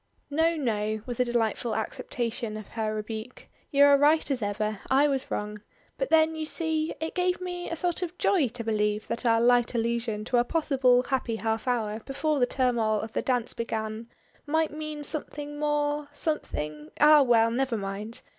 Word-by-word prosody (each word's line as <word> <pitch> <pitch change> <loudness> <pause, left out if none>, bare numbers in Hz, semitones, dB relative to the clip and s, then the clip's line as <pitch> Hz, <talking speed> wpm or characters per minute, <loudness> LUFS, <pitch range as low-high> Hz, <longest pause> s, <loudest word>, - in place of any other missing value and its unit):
"No 325 +3 +2
no," 215 -6 -1
with 245 -1 -6
a 250 - +3
delightful 235 -1 0
acceptation 230 0 -3
of 215 - -9
her 215 -1 -2
rebuke. 220 +3 -6 0.2
"You 280 0 +5
are 285 -1 +6
right 300 +1 +3
as 260 -3 -1
ever. 210 0 -2
I 275 +3 +5
was 270 -2 -1
wrong. 210 0 -4 0.4
But - - -1
then, 320 0 +4
you 315 -1 -4
see, 320 -1 -1
it 320 +1 -3
gave 360 0 0
me 355 -1 -5
a 335 - -2
sort 350 +1 -1
of 360 0 -4
joy 345 -9 +3
to 235 0 -5
believe 210 -1 0
that 235 +1 -2
our 230 0 +4
light 240 0 +3
allusion 230 -2 -1
to 245 - +1
a 240 - +4
possible 260 -4 +2
happy 255 -4 -1
half 220 +1 -2
hour 220 -3 0
before 285 +5 -1
the 245 - +3
turmoil 235 -5 +1
of 220 +1 -6
the - - 0
dance 245 -3 0
began 220 0 -4 0.4
might 320 +1 +1
mean 305 0 -5
something 295 -1 -5
more 295 0 0
something 150 - -3
Ah! 300 0 +8
well 230 -3 +4
never 250 -1 0
mind! 200 +3 -5
245 Hz, 185 wpm, -27 LUFS, 220-295 Hz, 0.4 s, Ah